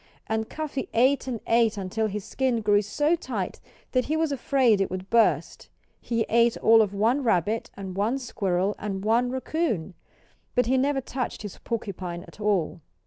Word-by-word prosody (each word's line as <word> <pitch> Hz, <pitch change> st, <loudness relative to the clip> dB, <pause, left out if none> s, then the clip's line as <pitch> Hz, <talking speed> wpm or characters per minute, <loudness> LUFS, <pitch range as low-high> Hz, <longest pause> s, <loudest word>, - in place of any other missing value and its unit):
And 220 Hz, 0 st, -2 dB
Cuffy 300 Hz, -4 st, -4 dB
ate 265 Hz, +4 st, +3 dB
and 240 Hz, -4 st, -3 dB
ate 230 Hz, -2 st, +3 dB
until 200 Hz, +3 st, -1 dB
his 210 Hz, -1 st, -5 dB
skin 255 Hz, -4 st, 0 dB
grew 205 Hz, -1 st, +4 dB
so 295 Hz, +11 st, +1 dB
tight 340 Hz, -, -4 dB, 0.3 s
that 255 Hz, -1 st, +1 dB
he 310 Hz, +2 st, 0 dB
was 320 Hz, -2 st, +1 dB
afraid 255 Hz, -5 st, +2 dB
it 195 Hz, -, 0 dB
would 185 Hz, +1 st, -6 dB
burst. 230 Hz, -1 st, +2 dB, 0.3 s
He 230 Hz, -2 st, -1 dB
ate 235 Hz, +1 st, +3 dB
all 225 Hz, 0 st, +6 dB
of 210 Hz, -3 st, +1 dB
one 225 Hz, +7 st, +1 dB
rabbit, 215 Hz, 0 st, +1 dB
and 190 Hz, -2 st, -6 dB
one 215 Hz, +7 st, +1 dB
squirrel, 200 Hz, -6 st, -1 dB
and 195 Hz, -1 st, -4 dB
one 235 Hz, +3 st, +3 dB
raccoon. 260 Hz, -, -2 dB, 0.6 s
But 250 Hz, -, +3 dB
he 255 Hz, +3 st, +2 dB
never 270 Hz, +1 st, +1 dB
touched 250 Hz, -3 st, -4 dB
his 205 Hz, -, -8 dB
porcupine 185 Hz, -6 st, -4 dB
at -, -, -16 dB
all. 195 Hz, -5 st, 0 dB
225 Hz, 175 wpm, -26 LUFS, 200-255 Hz, 0.6 s, all